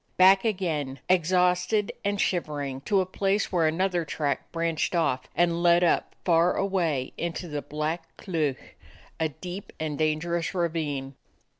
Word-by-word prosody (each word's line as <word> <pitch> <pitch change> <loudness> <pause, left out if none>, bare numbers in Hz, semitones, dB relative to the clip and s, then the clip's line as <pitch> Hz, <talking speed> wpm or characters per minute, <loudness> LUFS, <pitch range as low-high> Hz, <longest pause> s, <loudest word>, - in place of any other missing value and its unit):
Back 190 +1 +7
again, 165 - -1
exhausted 180 +3 +2
and 200 0 0
shivering, 145 -8 -1
to 200 -2 +3
a - - -1
place 195 +2 0
where 170 -4 +3
another 175 +2 +1
track 150 -2 -2
branched 165 0 -1
off 130 -6 +1
and 170 0 +2
led 175 0 +5
up 170 - +1
far 170 0 +4
away 170 -9 0
into 170 +1 -3
the 150 -2 -3
Black 155 +3 -3
Cleuch, 155 -7 -3 0.4
a 160 -1 +1
deep 180 +7 -8
and 155 -2 -3
dangerous 160 +3 0
ravine. 155 -6 -2
170 Hz, 140 wpm, -27 LUFS, 155-185 Hz, 0.4 s, Back